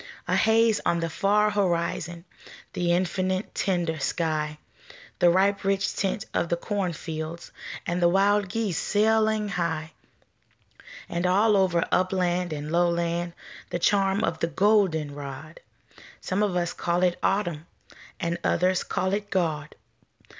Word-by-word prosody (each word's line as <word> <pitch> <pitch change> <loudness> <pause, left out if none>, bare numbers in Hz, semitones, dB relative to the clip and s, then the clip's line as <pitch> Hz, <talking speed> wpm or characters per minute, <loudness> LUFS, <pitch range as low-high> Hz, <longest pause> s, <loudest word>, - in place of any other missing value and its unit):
A - - +1
haze 225 0 +3
on 170 - +1
the 165 -1 -2
far 210 +3 +2
horizon, 175 -3 -1 0.5
The 175 -1 0
infinite, 185 +2 0
tender 175 -5 -1
sky, 155 -1 -1 0.6
The 175 - +6
ripe 195 +3 +2
rich 195 0 0
tint 205 +3 -1
of 170 - 0
the 170 - +1
cornfileds, 170 -4 -4 0.3
And 175 +1 -1
the 175 - +5
wild 200 +2 +3
geese 205 -4 -1
sailing 220 0 +2
high 160 -4 -2 1.2
And 175 +1 -1
all 205 +4 +4
over 185 -3 +2
upland 180 -1 +1
and 150 0 -5
lowland 170 0 0 0.4
The - - -2
charm 195 +2 +2
of 165 - -1
the 165 - 0
golden 185 -6 +2
rod 145 +3 -8 0.6
Some 190 +2 -2
of 205 -4 +1
us 175 -1 0
call 175 +1 0
it 180 -1 +1
Autumn 175 -5 -1 0.5
And 170 -2 -2
others 185 +1 +2
call 190 +1 -1
it 205 0 -2
God. 155 -5 -1
180 Hz, 135 wpm, -26 LUFS, 170-200 Hz, 1.2 s, The